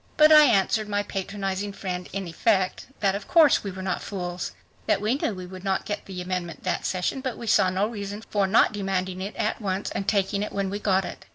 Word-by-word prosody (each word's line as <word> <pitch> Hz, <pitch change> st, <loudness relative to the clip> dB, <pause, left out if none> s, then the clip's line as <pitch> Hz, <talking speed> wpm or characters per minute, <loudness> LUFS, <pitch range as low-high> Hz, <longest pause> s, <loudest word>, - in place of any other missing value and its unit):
But 305 Hz, 0 st, +7 dB
I 305 Hz, -1 st, +9 dB
answered 215 Hz, -2 st, +2 dB
my 205 Hz, 0 st, 0 dB
patronizing 195 Hz, 0 st, -3 dB
friend, 180 Hz, -2 st, -5 dB
in 195 Hz, -2 st, -4 dB
effect, 190 Hz, +2 st, 0 dB
that 195 Hz, -2 st, +3 dB
of 200 Hz, +1 st, -5 dB
course 320 Hz, -5 st, +5 dB
we 200 Hz, -, -3 dB
were 190 Hz, 0 st, -7 dB
not 185 Hz, -1 st, -2 dB
fools, 180 Hz, -3 st, -4 dB, 0.3 s
that -, -, +3 dB
we 215 Hz, +3 st, +1 dB
knew 255 Hz, -6 st, -1 dB
we 185 Hz, -1 st, -7 dB
would 185 Hz, 0 st, -10 dB
not 195 Hz, -1 st, 0 dB
get 205 Hz, 0 st, -4 dB
the 185 Hz, -2 st, -5 dB
amendment 180 Hz, -2 st, -4 dB
that -, -, -1 dB
session, 185 Hz, +8 st, -1 dB
but 260 Hz, -3 st, -3 dB
we 235 Hz, -, -7 dB
saw 200 Hz, -3 st, +4 dB
no 190 Hz, +2 st, +1 dB
reason 205 Hz, -1 st, -6 dB
for 200 Hz, -2 st, +2 dB
not 215 Hz, +2 st, +4 dB
demanding 190 Hz, -2 st, -2 dB
it 200 Hz, +3 st, -5 dB
at 215 Hz, +2 st, -1 dB
once 195 Hz, -1 st, -2 dB
and 195 Hz, -, -3 dB
taking 200 Hz, 0 st, +1 dB
it 210 Hz, -, -4 dB
when 195 Hz, -1 st, -1 dB
we 205 Hz, -, -3 dB
got 190 Hz, -2 st, +2 dB
it. -, -, -8 dB
195 Hz, 235 wpm, -25 LUFS, 185-210 Hz, 0.3 s, I